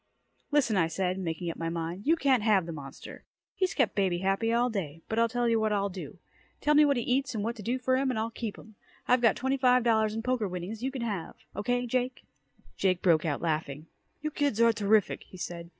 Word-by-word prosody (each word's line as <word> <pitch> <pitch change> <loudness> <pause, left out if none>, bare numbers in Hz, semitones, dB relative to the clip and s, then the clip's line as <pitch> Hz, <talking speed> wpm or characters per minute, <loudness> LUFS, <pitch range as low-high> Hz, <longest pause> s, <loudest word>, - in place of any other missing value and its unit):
"Listen," 270 -8 +2
I 165 -3 +3
said, 185 +3 -1
making 170 -1 -3
up - - -10
my 165 0 -2
mind. 170 +5 -4
"You 325 - +5
can't 270 -6 +2
have 210 -5 +3
the 170 - -5
monster. 140 -4 -9 0.3
He's 375 -2 -1
kept 260 -7 +2
baby 190 -3 +1
happy 195 +5 0
all 240 +1 +3
day. 165 -9 -4
But 225 - -1
I'll 230 0 +3
tell 245 0 0
you 230 -1 +3
what 220 0 +1
I'll 200 -1 +1
do. 185 -1 -8 0.4
Tell 300 - +2
me 300 0 +7
what 280 -2 +2
he 240 - -1
eats 255 +1 0
and 210 - -2
what 230 +2 -2
to - - -7
do 240 +5 -1
for 260 0 +1
him 270 0 +1
and 250 - -1
I'll 225 +1 -1
keep 225 -2 -5
him. 220 - -14 0.3
I've 250 0 +4
got 230 -3 +4
twenty 265 +2 0
five 250 -2 +4
dollars 220 -2 +2
in 225 - -3
poker 250 -4 0
winnings 180 +4 -5
you 260 - -1
can 265 -3 -5
have. 200 -7 -4 0.2
Okay 245 +4 0
Jake?" 250 +1 -2 0.5
Jake 185 - +1
broke 170 -3 +4
out 150 -1 -2
laughing. 155 -2 -2 0.4
"You 305 - -1
kids 285 -7 0
are 230 0 +5
terrific," 210 -1 +2
he 185 - -13
said. 170 -1 -6
220 Hz, 240 wpm, -29 LUFS, 180-250 Hz, 0.5 s, me